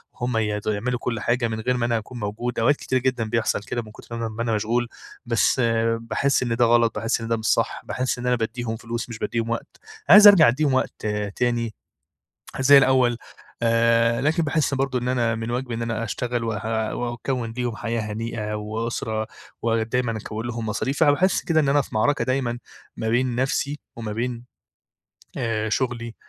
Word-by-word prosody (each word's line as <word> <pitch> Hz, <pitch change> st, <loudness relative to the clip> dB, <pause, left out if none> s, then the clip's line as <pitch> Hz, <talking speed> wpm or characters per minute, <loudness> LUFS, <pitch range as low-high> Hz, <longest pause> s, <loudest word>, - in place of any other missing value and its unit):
هم 120 Hz, -1 st, -2 dB
ي 105 Hz, -1 st, 0 dB
يعملوا 115 Hz, +4 st, -1 dB
كل 115 Hz, -2 st, -2 dB
حاجة 120 Hz, +3 st, 0 dB
من 110 Hz, -1 st, -4 dB
غير 125 Hz, +2 st, 0 dB
ما 120 Hz, -, 0 dB
أنا 120 Hz, -1 st, +1 dB
أكون 115 Hz, +3 st, -7 dB
موجود، 115 Hz, +3 st, -3 dB
أوقات 135 Hz, +6 st, +4 dB
كتيرة 130 Hz, -2 st, -1 dB
جدًا 130 Hz, -2 st, 0 dB
بيحصل 115 Hz, -2 st, 0 dB
كده، 120 Hz, +2 st, -3 dB
من 110 Hz, -, -12 dB
كتر 115 Hz, +2 st, -10 dB
ما -, -, -4 dB
أنا -, -, -1 dB
ما 115 Hz, -, -2 dB
أنا 115 Hz, -1 st, 0 dB
مشغول، 115 Hz, +3 st, 0 dB, 0.4 s
بس 120 Hz, +2 st, +2 dB, 0.4 s
باحس 130 Hz, +4 st, 0 dB
إن 115 Hz, -2 st, -1 dB
ده 120 Hz, 0 st, +4 dB
غلط، 115 Hz, -1 st, +3 dB
باحس 115 Hz, +2 st, -1 dB
إن 115 Hz, -, -4 dB
ده 115 Hz, 0 st, +1 dB
مش 110 Hz, -, -7 dB
صح، -, -, +1 dB
باحس 130 Hz, 0 st, -2 dB
إن 125 Hz, -, -3 dB
أنا 125 Hz, -, +3 dB
بادّيهم 115 Hz, 0 st, -3 dB
فلوس 120 Hz, +1 st, -5 dB
مش 115 Hz, -, -7 dB
بادّيهم 115 Hz, -1 st, -2 dB
وقت، 115 Hz, -, -4 dB, 0.3 s
عايز 205 Hz, +3 st, +10 dB
أرجَع 185 Hz, -7 st, +8 dB
أدّيهم 140 Hz, +3 st, +2 dB
وقت 130 Hz, -, -1 dB, 0.3 s
تاني 120 Hz, -2 st, 0 dB, 0.9 s
زي 140 Hz, +2 st, +8 dB
الأول 130 Hz, -3 st, +3 dB, 0.5 s
آآ، 115 Hz, 0 st, +3 dB
لكن 155 Hz, +4 st, +1 dB
باحس 150 Hz, -2 st, 0 dB
برضه 135 Hz, -1 st, 0 dB
إن 125 Hz, +1 st, -3 dB
أنا 120 Hz, -3 st, +1 dB
من 115 Hz, +1 st, -4 dB
واجبي 125 Hz, 0 st, -3 dB
إن 115 Hz, -, -3 dB
أنا 115 Hz, -1 st, -2 dB
أشتغل 120 Hz, +2 st, -2 dB
و -, -, -2 dB, 0.5 s
وأكوِّن 120 Hz, 0 st, -3 dB
ليهم 120 Hz, -2 st, -3 dB
حياة 115 Hz, 0 st, -2 dB
هنيئة، 110 Hz, 0 st, -4 dB
وأسرة 110 Hz, +1 st, -3 dB, 0.4 s
ودايمًا 115 Hz, 0 st, 0 dB
أكوِّن 110 Hz, +2 st, -6 dB
لهم 115 Hz, -1 st, -4 dB
مصاريف، 130 Hz, +8 st, -1 dB
أنا 145 Hz, -, +6 dB
باحس 185 Hz, +6 st, +2 dB
كده 165 Hz, -3 st, +3 dB
إن 140 Hz, -, +1 dB
أنا 145 Hz, +1 st, +4 dB
في -, -, -13 dB
معركة 140 Hz, +7 st, +2 dB
دايمًا 130 Hz, -2 st, -1 dB, 0.4 s
ما 110 Hz, -, -3 dB
بين 125 Hz, +1 st, +1 dB
نفسي 135 Hz, +3 st, -1 dB, 0.2 s
وما 110 Hz, -2 st, -5 dB
بين 120 Hz, +1 st, -3 dB, 0.9 s
آآ، 110 Hz, -2 st, -1 dB
شغلي 120 Hz, -1 st, -2 dB
120 Hz, 190 wpm, -23 LUFS, 115-125 Hz, 0.9 s, عايز